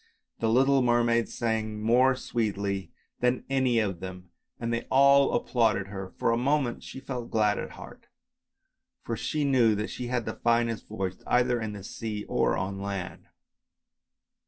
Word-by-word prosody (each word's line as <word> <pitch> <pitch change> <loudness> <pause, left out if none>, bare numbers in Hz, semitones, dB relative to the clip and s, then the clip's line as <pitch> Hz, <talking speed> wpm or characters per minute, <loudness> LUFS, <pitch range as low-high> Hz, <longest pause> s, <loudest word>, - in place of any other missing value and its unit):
The 115 - +1
little 135 +3 +4
mermaid 120 -1 +2
sang 110 -2 -2
more 125 +4 +4
sweetly 100 -6 -2 0.3
than 125 +1 +1
any 130 -3 +2
of 100 -6 0
them 90 -1 -8 0.3
and 115 0 -2
they 115 - -3
all 140 +1 +5
applauded 110 -5 +1
her. 95 -1 -6
For - - +1
a 115 - +2
moment 135 -1 0
she - - -9
felt 125 -3 -6
glad 105 -2 +2
at - - -6
heart, - - -12 1.0
for 115 - -3
she 150 +6 -1
knew 120 -6 +4
that 105 +1 -3
she 125 - -5
had 120 -2 -1
the 110 - -3
finest 115 -1 0
voice 95 -3 -4
either 125 -1 +2
in 110 -1 -4
the 100 -2 -8
sea 105 0 -5
or - - +1
on 95 +1 -3
land. 100 -2 -5
115 Hz, 160 wpm, -28 LUFS, 105-125 Hz, 1.0 s, all